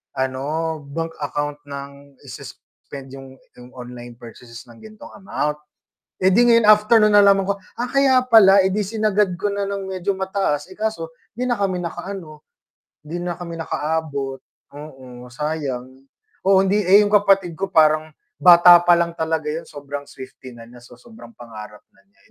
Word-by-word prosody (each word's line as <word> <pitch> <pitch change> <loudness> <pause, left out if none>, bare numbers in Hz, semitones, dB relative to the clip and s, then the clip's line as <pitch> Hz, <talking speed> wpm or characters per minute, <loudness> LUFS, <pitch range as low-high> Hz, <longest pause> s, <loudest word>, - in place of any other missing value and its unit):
ano, 145 +5 -3
bank 165 +3 -5
account 145 0 -4
ng 140 0 -10
i-suspend 135 +1 -12
yung 135 -1 -12 0.2
yung 125 0 -15
online 120 -1 -10
purchases 115 0 -13
ng 115 -1 -17
ganitong 215 -1 -14
amount. 150 -6 -3 0.6
Eh, 190 - +4
di 240 +5 +4
ngayon 230 -2 +4
afternoon 215 0 +5
nalaman 200 -1 +5
ko, 200 0 -2 0.2
ah, 245 +1 -3
kaya 275 -2 +3
pala. 200 -5 +6
Eh, 190 - 0
di 210 - 0
sinagad 210 -2 0
ko 205 - -2
na 200 0 -2
ng 200 -1 -5
medyo 190 +1 -2
mataas, 190 -6 -2
eh, 185 - -12
kaso 215 -7 -3 0.3
'di 250 - -3
na 245 - +1
kami 190 -2 -1
nakaano, 170 -3 -8 0.6
di 160 +4 -7
na 175 -1 -4
kami 170 -1 -7
nakaabot, 150 -4 -3 0.4
oo, 130 -4 -12
sayang. 140 -3 -4 0.6
Oo, 195 -1 +5
hindi 205 +2 +1
eh, 195 +3 +6
yung 205 - -2
kapatid 195 -4 +2
ko 195 +3 -5
parang 155 -2 +3 0.3
bata 175 0 +8
pa 175 0 +5
lang 170 0 -1
talaga 160 -1 -2
yun, 165 +2 -5
sobrang 145 0 -8
Swifty 130 0 -12
na 115 - -12
niya, 120 +1 -15
so 120 0 -16
sobrang 230 0 -15
pangarap 105 -2 -11 0.2
na - - -26
niya. 200 - -37
165 Hz, 165 wpm, -20 LUFS, 140-200 Hz, 0.6 s, bata